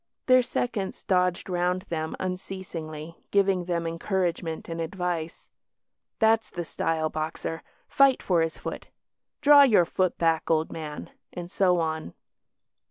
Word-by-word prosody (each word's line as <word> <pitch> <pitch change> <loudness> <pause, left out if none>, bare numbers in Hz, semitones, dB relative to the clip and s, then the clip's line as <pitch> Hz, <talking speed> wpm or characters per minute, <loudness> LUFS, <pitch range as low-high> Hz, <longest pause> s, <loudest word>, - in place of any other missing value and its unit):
Their 255 0 +6
seconds 230 -5 -3
dodged 180 -2 +1
round 180 0 0
them 160 -4 -3
unceasingly, 175 -4 -6
giving 195 -3 +2
them 170 -1 -1
encouragement 165 -1 -2
and 165 0 -4
advice 170 -1 -4 0.7
"That's 220 0 +3
the 175 - -4
style, 160 0 -1
Boxer 160 +1 -4 0.3
fight 275 -2 +4
for 175 -3 +2
his 165 0 -1
foot" - - -6 0.5
"Draw 290 0 +8
your 220 -11 +6
foot 185 +1 0
back, 165 -1 +1
old 160 -1 +1
man," 150 -2 -7 0.2
and 175 0 -7
so 185 -3 +3
on. 160 - -3
175 Hz, 130 wpm, -26 LUFS, 165-190 Hz, 0.7 s, Draw